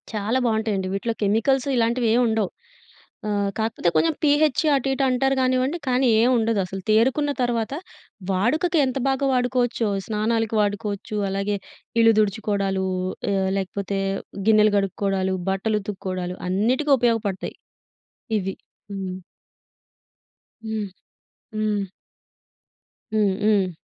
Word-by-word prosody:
చాలా 215 Hz, +4 st, 0 dB
బాగుంటాయండి 220 Hz, -4 st, 0 dB
వీటిలో 225 Hz, +4 st, -1 dB
కెమికల్సు 230 Hz, +6 st, +2 dB
ఇలాంటివేం 235 Hz, 0 st, +2 dB
ఉండవు, 220 Hz, -4 st, 0 dB, 0.8 s
ఆహ్, 200 Hz, -1 st, 0 dB
కాకపోతే 220 Hz, -5 st, 0 dB
కొంచెం 160 Hz, 0 st, +3 dB
పీహెచే 300 Hz, +1 st, +3 dB
అటు 270 Hz, 0 st, 0 dB
ఇటు 270 Hz, -, 0 dB
అంటారు 270 Hz, +2 st, +2 dB
కానివ్వండి, 255 Hz, +4 st, +1 dB
కానీ 255 Hz, +1 st, +2 dB
ఏం 240 Hz, -, +4 dB
ఉండదసలు. 200 Hz, -4 st, -1 dB
తేరుకున్న 265 Hz, +7 st, +3 dB
తర్వాత 235 Hz, 0 st, -1 dB, 0.6 s
వాడుకకి 305 Hz, -, +1 dB
ఎంత 255 Hz, 0 st, -2 dB
బాగా 270 Hz, +1 st, 0 dB
వాడుకోవచ్చో 245 Hz, -3 st, +1 dB, 0.2 s
స్నానాలకి 225 Hz, +1 st, 0 dB
వాడుకోవచ్చు, 205 Hz, 0 st, -2 dB
అలాగే 200 Hz, +1 st, -1 dB, 0.4 s
ఇల్లు 225 Hz, 0 st, +6 dB
తుడుచుకోవడాలు 200 Hz, -2 st, 0 dB, 0.5 s
ఆహ్, 190 Hz, -1 st, +1 dB
లేకపోతే 195 Hz, +1 st, -3 dB, 0.5 s
గిన్నెలు 215 Hz, -1 st, +5 dB
కడుక్కోవడాలు, 195 Hz, -1 st, 0 dB
బట్టలు 210 Hz, +3 st, 0 dB
ఉతుక్కోవడాలు 185 Hz, -2 st, -4 dB
అన్నిటికి 250 Hz, +10 st, +2 dB
ఉపయోగపడతాయి 225 Hz, -5 st, 0 dB, 0.8 s
ఇవి. 195 Hz, -1 st, -4 dB, 0.4 s
హ్మ్. 190 Hz, -2 st, -4 dB, 1.5 s
హ్మ్. 220 Hz, -2 st, -3 dB, 0.7 s
హ్మ్. 210 Hz, -2 st, 0 dB, 1.3 s
హ్మ్. 205 Hz, -3 st, +2 dB
హ్మ్. 200 Hz, -4 st, +3 dB
215 Hz, 105 wpm, -23 LUFS, 195-245 Hz, 1.5 s, ఇల్లు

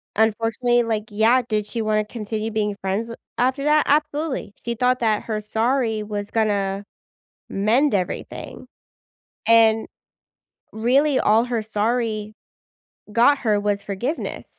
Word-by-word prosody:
unfortunately, 225 Hz, +3 st, +2 dB
like, 220 Hz, -2 st, -2 dB
yeah, 225 Hz, +5 st, +3 dB
did 210 Hz, -2 st, -1 dB
she 230 Hz, -, -3 dB
wanna 215 Hz, -1 st, +1 dB
continue 220 Hz, 0 st, -4 dB
being 210 Hz, -2 st, -1 dB
friends 195 Hz, +4 st, -1 dB
with 230 Hz, -, -8 dB, 0.2 s
after 260 Hz, +3 st, +1 dB
that? 300 Hz, 0 st, +4 dB
Absolutely. 300 Hz, -5 st, 0 dB
She 235 Hz, -, -1 dB
thought 250 Hz, +2 st, +2 dB
that 220 Hz, -3 st, +1 dB
her 215 Hz, -2 st, -3 dB
sorry 225 Hz, 0 st, 0 dB
was 205 Hz, -1 st, -5 dB
gonna 200 Hz, -3 st, 0 dB, 0.7 s
mend 225 Hz, +6 st, +2 dB
everything, 185 Hz, -2 st, -4 dB, 0.8 s
and 225 Hz, -1 st, +5 dB, 0.9 s
really 260 Hz, +6 st, +2 dB
all 220 Hz, +3 st, +4 dB
her 235 Hz, -3 st, -2 dB
sorry 215 Hz, 0 st, -1 dB, 0.8 s
got 245 Hz, +6 st, +4 dB
her 210 Hz, -4 st, +1 dB
was 205 Hz, -1 st, -1 dB
forgiveness. 235 Hz, -, -4 dB
220 Hz, 130 wpm, -22 LUFS, 210-245 Hz, 0.9 s, and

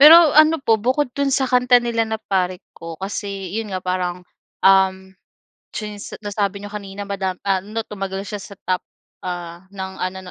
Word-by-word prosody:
pero 320 Hz, +1 st, +10 dB
ano 310 Hz, +2 st, +7 dB
po 220 Hz, -2 st, +3 dB
bukod 255 Hz, +2 st, +1 dB
dun 280 Hz, -1 st, 0 dB
sa 270 Hz, 0 st, +2 dB
kanta 250 Hz, -1 st, +5 dB
nila 230 Hz, -2 st, 0 dB
na 220 Hz, -, -1 dB
"Pare 185 Hz, -4 st, -1 dB
Ko" 165 Hz, -1 st, -8 dB
kasi 195 Hz, -1 st, -4 dB
yun 220 Hz, 0 st, -2 dB
nga 185 Hz, -1 st, -3 dB
parang, 180 Hz, -1 st, -2 dB, 0.4 s
uhm, 190 Hz, 0 st, +4 dB, 0.6 s
since 210 Hz, -1 st, -6 dB
nasabi 200 Hz, -1 st, -1 dB
n'yo 205 Hz, +1 st, -8 dB
kanina 200 Hz, 0 st, -6 dB
madam 190 Hz, -2 st, -2 dB
ah, 190 Hz, -1 st, +2 dB
'no, 215 Hz, +3 st, -4 dB
tumagal 195 Hz, -1 st, -4 dB
siya 205 Hz, -1 st, -5 dB
sa 200 Hz, -, -10 dB
top, 185 Hz, 0 st, +1 dB, 0.4 s
ah, 175 Hz, 0 st, -6 dB
ng 190 Hz, -1 st, -6 dB
ano, 185 Hz, +1 st, -2 dB
200 Hz, 175 wpm, -21 LUFS, 190-225 Hz, 0.6 s, pero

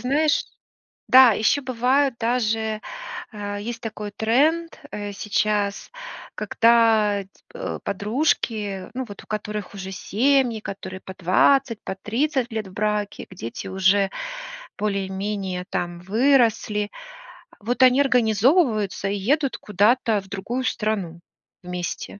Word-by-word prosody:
знаешь, 290 Hz, +4 st, +2 dB, 0.6 s
да, 255 Hz, -3 st, +8 dB
ещё 220 Hz, +7 st, +2 dB
бывают 255 Hz, +1 st, +1 dB
даже, 225 Hz, -2 st, 0 dB, 0.5 s
а 205 Hz, -1 st, -5 dB
есть 235 Hz, +2 st, -5 dB
такой 215 Hz, -2 st, -6 dB
тренд, 300 Hz, +11 st, +1 dB
э, 205 Hz, -1 st, -5 dB
сейчас, 210 Hz, 0 st, -1 dB, 0.4 s
когда, 225 Hz, -3 st, +3 dB
э, -, -, -7 dB
ь -, -, -25 dB, 0.3 s
э, -, -, -4 dB
подружки, 210 Hz, -3 st, -1 dB
ну 260 Hz, 0 st, -3 dB
вот 200 Hz, -, -10 dB
у -, -, -26 dB
которых 210 Hz, -2 st, -4 dB
уже 190 Hz, -1 st, -6 dB
семьи, 245 Hz, +2 st, +1 dB
которые 190 Hz, -2 st, -7 dB
по 190 Hz, -, -9 dB
20, 230 Hz, +7 st, +2 dB
по -, -, -3 dB
30 245 Hz, +4 st, -1 dB
лет 215 Hz, -3 st, -3 dB
в -, -, -14 dB
браке, 210 Hz, -1 st, -2 dB
где 180 Hz, -11 st, -8 dB
дети 115 Hz, -, -6 dB
уже 190 Hz, +1 st, +3 dB, 0.7 s
более-менее 195 Hz, -2 st, -2 dB
там 175 Hz, 0 st, -3 dB
выросли. 220 Hz, -1 st, +2 dB, 0.7 s
Вот 245 Hz, +5 st, -2 dB
они 255 Hz, +2 st, +6 dB
организовываются 230 Hz, -, +2 dB
и 200 Hz, -, -1 dB
едут 270 Hz, +8 st, 0 dB
куда-то 210 Hz, +1 st, +2 dB
в 190 Hz, -, -18 dB
другую 235 Hz, +7 st, -3 dB
страну 200 Hz, -8 st, -2 dB, 0.4 s
вместе. 180 Hz, +2 st, -5 dB
215 Hz, 125 wpm, -23 LUFS, 200-250 Hz, 0.7 s, да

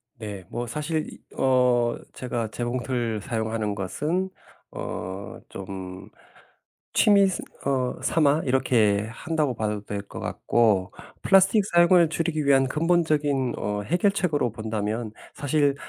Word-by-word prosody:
네. 105 Hz, -5 st, -7 dB
뭐 120 Hz, +1 st, -3 dB
사실 155 Hz, +4 st, -2 dB
이 -, -, -11 dB, 0.2 s
어 125 Hz, -2 st, +3 dB, 0.2 s
제가 120 Hz, -3 st, -3 dB
재봉틀 120 Hz, -1 st, -2 dB
사용하는 110 Hz, -1 st, -2 dB
것은 155 Hz, -, -2 dB, 0.4 s
어 95 Hz, +2 st, -6 dB
좀 95 Hz, -1 st, -8 dB, 0.8 s
취미 200 Hz, -3 st, +5 dB
스 190 Hz, -, -2 dB, 0.2 s
어 130 Hz, -2 st, 0 dB
삼아 150 Hz, +1 st, +3 dB
이렇게 115 Hz, -6 st, +2 dB
한다고 150 Hz, +2 st, -1 dB
봐도 105 Hz, -1 st, -2 dB
될 100 Hz, 0 st, -4 dB
것 -, -, -8 dB
같고. 100 Hz, -6 st, +1 dB, 0.3 s
플라스틱 195 Hz, +2 st, +5 dB
사용을 175 Hz, -2 st, +5 dB
줄이기 160 Hz, -2 st, -1 dB
위한 135 Hz, -1 st, +4 dB
근본적인 150 Hz, -5 st, +1 dB
어 105 Hz, 0 st, -2 dB
해결책으로 175 Hz, -, +1 dB
본다면 110 Hz, 0 st, -3 dB, 0.2 s
사실 145 Hz, 0 st, +1 dB
125 Hz, 240 characters per minute, -25 LUFS, 110-155 Hz, 0.8 s, 취미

